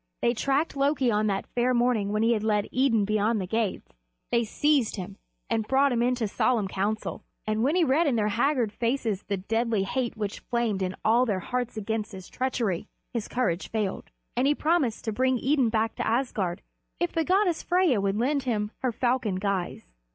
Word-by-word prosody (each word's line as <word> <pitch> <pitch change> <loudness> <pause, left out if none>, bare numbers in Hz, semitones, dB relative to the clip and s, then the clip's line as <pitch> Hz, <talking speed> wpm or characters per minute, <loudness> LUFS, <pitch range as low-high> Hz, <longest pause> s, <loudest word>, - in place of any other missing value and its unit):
They 235 - +3
tracked 275 +7 0
Loki 275 -3 +2
on 210 0 +1
that 195 -1 -1
fair 245 +1 0
morning 235 -4 +2
when 215 +1 +1
he 230 -1 +3
led 210 -1 0
Idun 245 -5 +3
beyond 215 +2 +1
the 190 - -2
gates; 210 - -2 0.4
they 235 0 +3
seized 275 +1 +1
him 195 0 -7 0.3
and 225 -2 -1
brought 275 +1 +3
him 235 -1 +1
into 245 -2 +1
solemn 220 0 +1
council, 205 +3 -2 0.2
and 215 0 0
when 280 +7 +2
he 365 - +4
read 310 +3 +3
in 270 - +2
their 210 -2 +1
haggard 240 0 +1
faces 230 -3 -1
the 200 - -3
deadly 225 +2 0
hate 240 +3 -2
which 205 -2 -3
flamed 235 -5 -1
in 185 0 -2
all 240 +3 +4
their 195 -4 0
hearts 245 +2 -3
against 215 +1 -3
his 190 -1 -9
treachery, 235 -7 -1 0.3
his 230 -3 -2
courage 215 -8 -1
failed, 210 -4 -3 0.3
and 250 +3 +2
he 295 - +3
promised 300 -8 0
to 220 - 0
bring 255 +3 +1
Idun 265 -1 +2
back 220 0 0
to - - -1
Asgard 220 -7 -1 0.4
if 350 0 0
the 325 - +1
goddess 370 0 +2
Freyja 350 - +2
would 195 +1 0
lend 275 +5 +1
him 215 -5 -1
her 255 - 0
falcon 240 -4 0
guise. 185 - -3
230 Hz, 195 wpm, -27 LUFS, 210-260 Hz, 0.4 s, he